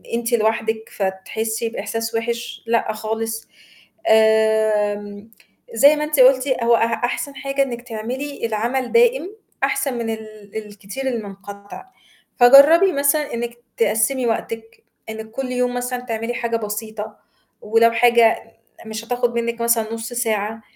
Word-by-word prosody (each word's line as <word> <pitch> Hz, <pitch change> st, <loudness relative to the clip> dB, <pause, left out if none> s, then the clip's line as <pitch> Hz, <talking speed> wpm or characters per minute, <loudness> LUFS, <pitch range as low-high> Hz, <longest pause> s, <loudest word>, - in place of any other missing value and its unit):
أنتِ 235 Hz, +1 st, -2 dB
لوحدِك 220 Hz, 0 st, 0 dB
فتحسّي 220 Hz, +4 st, -3 dB
بإحساس 225 Hz, +1 st, -4 dB
وِحِش، 235 Hz, +1 st, -3 dB
لأ 230 Hz, -1 st, +1 dB
خالص، 225 Hz, +1 st, -4 dB, 0.6 s
آمم، 220 Hz, -1 st, +2 dB, 0.4 s
زي 280 Hz, +6 st, +6 dB
ما 300 Hz, -, -2 dB
أنتِ 300 Hz, -2 st, -1 dB
قُلتِ 260 Hz, +1 st, +5 dB, 0.2 s
هو 235 Hz, 0 st, +5 dB
أح 230 Hz, 0 st, 0 dB
أحسن 275 Hz, +3 st, -4 dB
حاجة 275 Hz, +1 st, -1 dB
إنِّك 240 Hz, -3 st, -5 dB
تعملي 245 Hz, +4 st, -5 dB
العمل 235 Hz, +4 st, -2 dB
دائم 470 Hz, -4 st, +3 dB, 0.3 s
أحسن 270 Hz, -1 st, 0 dB
من 230 Hz, -1 st, -3 dB
ال 215 Hz, -2 st, -8 dB
الكتير 210 Hz, +5 st, -7 dB
المنقطع، 200 Hz, -, -7 dB, 0.5 s
فجرّبي 285 Hz, +9 st, +8 dB
مثلًا 285 Hz, +1 st, +1 dB
إنِك 235 Hz, 0 st, -4 dB, 0.2 s
تقسّمي 225 Hz, +4 st, +1 dB
وقتِك، 225 Hz, 0 st, -4 dB, 0.3 s
إنِّك 220 Hz, 0 st, -7 dB
كُلّ 255 Hz, +1 st, -4 dB
يوم 250 Hz, 0 st, 0 dB
مثلًا 250 Hz, 0 st, -3 dB
تعملي 230 Hz, -1 st, -4 dB
حاجة 235 Hz, -1 st, -1 dB
بسيطة، 215 Hz, 0 st, -5 dB, 0.4 s
ولو 225 Hz, +2 st, +3 dB
حاجة 235 Hz, -1 st, +4 dB, 0.4 s
مش 220 Hz, +1 st, -6 dB
هتاخد 245 Hz, 0 st, -1 dB
منِّك 235 Hz, 0 st, -2 dB
مثلًا 230 Hz, -1 st, +1 dB
نُصّ 230 Hz, +1 st, -5 dB
ساعة، 220 Hz, -2 st, -1 dB
230 Hz, 130 wpm, -20 LUFS, 220-250 Hz, 0.6 s, فجرّبي